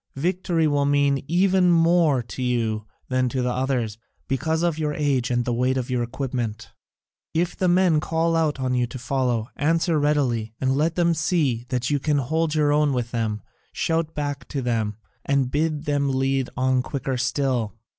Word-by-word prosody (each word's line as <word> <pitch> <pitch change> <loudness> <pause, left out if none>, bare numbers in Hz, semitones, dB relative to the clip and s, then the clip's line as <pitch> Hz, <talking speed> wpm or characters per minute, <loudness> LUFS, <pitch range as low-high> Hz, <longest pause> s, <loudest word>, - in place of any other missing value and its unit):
Victory 170 +2 0
will 145 -2 +2
mean 140 -1 +2
even 185 +2 +3
more 165 -5 +3
to 120 - -8
you 115 -4 -1 0.2
than 130 -1 +1
to 130 0 -1
the 125 - 0
others, 125 -4 -1 0.3
because 160 +5 0
of 170 -2 0
your 150 -1 -1
age 140 -5 0
and 120 -1 0
the 120 - 0
weight 125 +2 +1
of 125 0 -3
your 125 -1 +1
equipment. 120 -3 -4 0.6
If 170 +2 0
the 185 - 0
men 180 -1 +4
in 155 - +3
front - - -7
call 165 +1 +1
on 145 -6 0
you 125 -1 +1
to 120 - -8
follow, 125 -3 -1
answer 165 +1 +1
readily, 125 -7 0
and 130 0 +1
let 160 +3 +1
them 170 -1 +3
see 150 -7 0
that 125 +1 -1
you 145 - +2
can 145 +1 +1
hold 160 +4 0
your 150 -1 +3
own 150 -1 +2
with 120 -2 -2
them, 110 -3 -2 0.3
shout 165 -1 -1
back 145 -2 -3
to 140 -3 -3
them, 110 -4 -1 0.3
and 140 -2 +1
bid 150 0 -1
them 145 -1 +1
lead 135 0 0
on 130 0 +2
quicker 135 0 -3
still. 125 -3 -1
135 Hz, 185 wpm, -24 LUFS, 125-155 Hz, 0.6 s, men